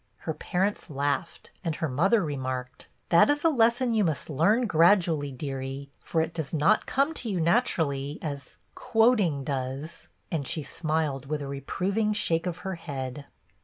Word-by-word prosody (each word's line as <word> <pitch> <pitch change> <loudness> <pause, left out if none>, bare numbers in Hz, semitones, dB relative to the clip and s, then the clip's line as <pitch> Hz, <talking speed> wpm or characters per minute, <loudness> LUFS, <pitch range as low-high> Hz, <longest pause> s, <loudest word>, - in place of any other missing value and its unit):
Her 160 - -3
parents 190 +5 -1
laughed, 140 -3 -2
and 165 -3 -1
her 160 - -2
mother 185 - +2
remarked, 130 -3 -4
— - - -43
" - - -43
That 170 +10 +6
is 290 0 +1
a 330 - +5
lesson 240 -2 +3
you 220 -2 +3
must 160 -2 -1
learn 205 - +3
gradu 175 +1 +5
ally, 145 -3 -1
dearie, 135 0 -5
for 165 - -1
it 160 +1 -5
does 160 -1 -4
not 170 +9 +3
come 280 +4 +1
to 245 -7 -5
you 190 -4 -1
natu 215 +10 +2
rally 140 -2 -1
as 140 -4 -6
— - - -43 0.2
quoting 220 - +3
does;" 135 +4 -4 0.2
and 145 -5 -2
she 155 - -2
smiled 155 -4 -2
with 150 0 -2
a - - -5
reproving 195 - -1
shake 165 -4 +1
of 170 -2 -3
her 190 - -2
head. 140 -2 -5
160 Hz, 185 wpm, -27 LUFS, 140-200 Hz, 0.2 s, That